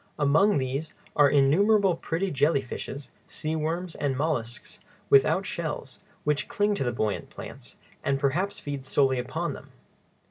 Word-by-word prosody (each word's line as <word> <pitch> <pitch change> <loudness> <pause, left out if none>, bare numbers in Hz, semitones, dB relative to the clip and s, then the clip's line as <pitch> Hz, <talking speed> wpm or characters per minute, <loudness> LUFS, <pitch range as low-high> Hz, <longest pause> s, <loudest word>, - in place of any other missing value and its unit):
Among 155 +8 +4
these 135 +4 -3 0.2
are 145 -1 +6
innumerable 185 +8 +4
pretty 175 +3 -2
jelly 140 0 +2
fishes, 135 +2 -7 0.2
sea 155 +1 -3
worms, 165 +3 -2
and 140 -3 -2
mollusks 120 -6 -3 0.3
without 160 +8 +5
shells, 155 -6 -4 0.2
which 150 -1 0
cling 210 -3 +1
to 200 - -1
the 120 - 0
buoyant 110 -3 -2
plants, - - -10 0.3
and 135 0 +1
perhaps 175 +9 0
feed 140 -2 -5
solely 135 -1 +2
upon 125 - -3
them. - - -11
145 Hz, 145 wpm, -27 LUFS, 135-170 Hz, 0.3 s, are